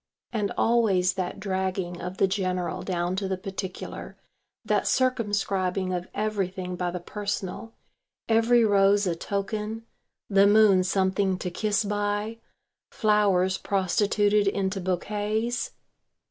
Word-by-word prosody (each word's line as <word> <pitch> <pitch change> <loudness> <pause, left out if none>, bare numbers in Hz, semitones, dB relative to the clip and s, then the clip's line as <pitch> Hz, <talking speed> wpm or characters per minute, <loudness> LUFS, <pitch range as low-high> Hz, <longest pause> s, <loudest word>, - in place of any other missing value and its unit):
And 210 -3 -1
always 200 -6 +3
that 185 +1 -4
dragging 190 -2 -2
of 180 +1 -6
the - - +4
general 185 -2 -2
down 175 -1 -2
to 195 0 -1
the 190 -1 -2
particular, 190 0 -6 0.5
that - - +1
circumscribing 205 -7 0
of 180 0 -3
everything 190 -4 -2
by 180 0 -2
the 180 +1 -4
personal, 205 +3 -5 0.5
every 230 +1 +4
rose 200 0 +4
a 175 -2 0
token, 210 +5 -3 0.4
the 200 0 +5
moon 205 -3 +5
something 190 0 +1
to 180 -1 -4
kiss 210 +2 0
by, 205 +2 -2 0.5
flowers 195 -3 +2
prostituted 205 +2 +2
into 195 -1 -1
bouquets. 210 +6 -1
195 Hz, 120 wpm, -26 LUFS, 185-210 Hz, 0.5 s, the